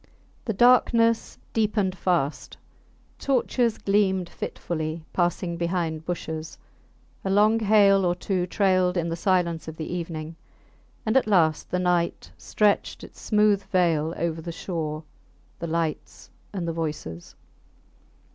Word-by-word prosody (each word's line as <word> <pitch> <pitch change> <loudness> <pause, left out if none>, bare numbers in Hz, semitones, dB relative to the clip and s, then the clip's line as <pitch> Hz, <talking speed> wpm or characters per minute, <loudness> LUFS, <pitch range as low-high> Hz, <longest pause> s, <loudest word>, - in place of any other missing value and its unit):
The 220 - -1
darkness 230 0 +3 0.2
deepened 210 -4 +1
fast; 170 -6 -1 0.6
torches 245 -3 +1
gleamed 190 -3 +1
fitfully, 160 -1 -4
passing 175 -1 0
behind 170 -2 -2
bushes; 160 -2 -5 0.7
a 190 - -2
long 210 +3 +4
hail 200 -2 +5
or 175 -1 +1
two 180 -1 -2
trailed 185 -1 +2
in 170 -1 0
the 165 - -2
silence 170 -3 0
of 160 0 -7
the 155 - -4
evening; 165 -2 -5 0.7
and 220 +2 0
at 265 - +4
last 165 -7 +2
the 180 - 0
night 180 -1 0
stretched 210 -1 0
its - - -13
smooth 210 -2 +3
veil 165 -3 +1
over 165 -1 -2
the 170 - -6
shore, 160 -2 -4 0.6
the 170 - -4
lights, 165 -2 -3 0.2
and 180 -4 -4
the 165 - -1
voices. 150 - -5
175 Hz, 130 wpm, -25 LUFS, 165-200 Hz, 0.7 s, hail